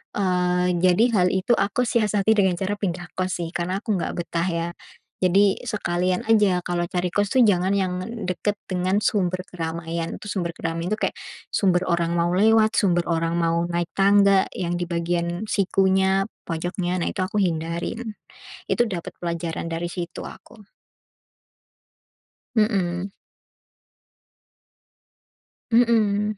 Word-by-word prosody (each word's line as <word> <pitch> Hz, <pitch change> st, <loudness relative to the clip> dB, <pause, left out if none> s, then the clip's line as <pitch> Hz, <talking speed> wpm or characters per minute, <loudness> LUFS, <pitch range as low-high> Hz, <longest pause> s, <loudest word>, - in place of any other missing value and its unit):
eee, 180 Hz, -2 st, +1 dB
jadi 185 Hz, +4 st, +4 dB, 0.2 s
hal 180 Hz, -, +4 dB
itu 190 Hz, +5 st, 0 dB
aku 205 Hz, +3 st, +1 dB
siasati 215 Hz, -3 st, +1 dB
dengan 195 Hz, -4 st, +3 dB
cara 195 Hz, +3 st, -3 dB
pindah 175 Hz, -3 st, -3 dB
kos, 185 Hz, 0 st, -1 dB
sih, 165 Hz, -, -5 dB
karena 185 Hz, +4 st, -3 dB
aku 215 Hz, -, 0 dB
enggak -, -, -3 dB
betah, 170 Hz, 0 st, -2 dB
ya. 170 Hz, -1 st, -1 dB, 0.5 s
Jadi 195 Hz, +2 st, +3 dB
sekalian 180 Hz, -5 st, -1 dB
aja 205 Hz, -5 st, +4 dB
kalau 175 Hz, -1 st, -1 dB
cari 180 Hz, -1 st, -1 dB
kos 205 Hz, +1 st, 0 dB
tuh, 255 Hz, -, +7 dB
jangan 190 Hz, -3 st, +3 dB
yang 185 Hz, -2 st, -1 dB, 0.3 s
dekat 205 Hz, +3 st, -1 dB
dengan 185 Hz, +1 st, 0 dB
sumber 185 Hz, -3 st, +1 dB
keramaian. 165 Hz, -1 st, -4 dB
Itu 210 Hz, -, -9 dB
sumber 175 Hz, -4 st, -2 dB
keramaian 165 Hz, +4 st, -3 dB
tu 215 Hz, -, -17 dB
kayak, -, -, -3 dB, 0.4 s
sumber 185 Hz, -2 st, +2 dB
orang 170 Hz, -1 st, +1 dB
mau 170 Hz, 0 st, +1 dB
lewat, 220 Hz, +3 st, +4 dB
sumber 175 Hz, -4 st, +2 dB
orang 165 Hz, 0 st, 0 dB
mau 170 Hz, 0 st, +1 dB
naik 175 Hz, -1 st, -2 dB
tangga, 200 Hz, 0 st, +5 dB
yang 175 Hz, -1 st, -2 dB
di 175 Hz, -, -1 dB
bagian 170 Hz, +1 st, -1 dB
sikunya, 190 Hz, 0 st, +2 dB, 0.2 s
pojoknya. 175 Hz, +2 st, -2 dB
Nah, -, -, 0 dB
itu -, -, -8 dB
aku 200 Hz, -, -4 dB
hindarin. 170 Hz, +6 st, -2 dB, 0.5 s
Itu 240 Hz, -1 st, +1 dB
dapat 175 Hz, -4 st, -5 dB
pelajaran 170 Hz, -1 st, -3 dB
dari 165 Hz, +1 st, -3 dB
situ 175 Hz, -2 st, -5 dB
aku. 215 Hz, -3 st, -13 dB, 1.9 s
Mhm. 195 Hz, -4 st, +1 dB, 2.6 s
Mhm, 215 Hz, -3 st, +3 dB
180 Hz, 135 wpm, -23 LUFS, 175-200 Hz, 2.6 s, tuh